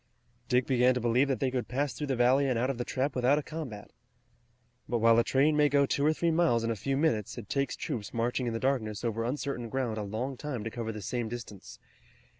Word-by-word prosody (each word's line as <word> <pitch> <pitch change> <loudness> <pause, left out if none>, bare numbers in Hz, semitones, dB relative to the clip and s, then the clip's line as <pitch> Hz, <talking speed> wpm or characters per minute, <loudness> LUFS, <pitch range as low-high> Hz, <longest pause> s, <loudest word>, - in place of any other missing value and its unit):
Dick 125 0 +3
began 125 -1 +3
to - - 0
believe 120 +3 +2
that 135 -2 -1
they 130 -2 0
would 125 -2 -2
pass 140 +2 -1
through 150 - -4
the 135 - 0
valley 130 +3 +3
and 125 - +1
out 125 +3 +1
of 125 - -7
the - - 0
trap 130 +3 -2
without 130 +3 +3
a 150 - -1
combat. 135 -11 -7 1.0
But 120 - +1
while 115 0 +5
a - - +4
train 145 +5 +3
may 150 -1 +4
go 140 0 +4
two 140 - -1
or 155 - +4
three 165 +1 0
miles 160 -9 +2
in 115 - 0
a - - -1
few 135 +7 -2
minutes 130 -10 0
it 110 -4 -8
takes 140 0 -1
troops 120 -9 -4
marching 120 +2 -1
in 115 - -1
the 115 - -2
darkness 115 -6 -1
over 115 -1 -1
uncertain 125 -1 -3
ground 120 -3 -2
a - - -2
long 115 +6 -4
time 135 -7 -4
to 115 - -4
cover 115 -2 -4
the 105 -2 -7
same 120 +2 -2
distance. 115 -4 -8
125 Hz, 245 wpm, -29 LUFS, 115-140 Hz, 1.0 s, while